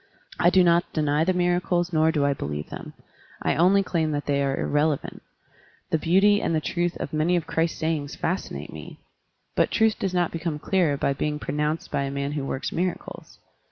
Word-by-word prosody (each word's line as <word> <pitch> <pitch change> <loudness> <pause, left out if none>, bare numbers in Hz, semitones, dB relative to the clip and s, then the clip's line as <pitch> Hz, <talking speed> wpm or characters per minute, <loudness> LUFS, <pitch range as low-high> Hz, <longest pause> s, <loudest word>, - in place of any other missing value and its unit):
I 175 - +5
do 185 0 +5
not 170 0 +3
deny 150 0 +1
the 185 - +2
miracles 175 -1 0
nor 160 0 +4
do 150 -3 +1
I 140 - +2
believe 75 - -5
them; - - -8 0.5
I - - +2
only 190 +4 +4
claim 165 -4 0
that 145 0 -2
they 140 -1 +1
are 135 -1 0
irrelevant. 150 0 0 0.7
The 160 - +2
beauty 195 +6 +4
and 165 - 0
the - - +2
truth 175 +2 -2
of - - -5
many 155 +4 +2
of 170 - 0
Christ's 165 0 -1
sayings 160 -3 -2
fascinate 180 +4 -3
me, - - -9 0.6
but - - +3
truth 220 -1 +2
does 190 - -1
not 175 -2 +1
become 165 -2 -3
clearer 160 -3 +1
by 140 - +1
being 150 +2 -2
pronounced 150 +2 -2
by - - 0
a 140 - -2
man 140 +1 -3
who 145 -2 -3
works 135 - -3
mira 180 +1 0
cles. - - -12
160 Hz, 200 wpm, -25 LUFS, 145-175 Hz, 0.7 s, I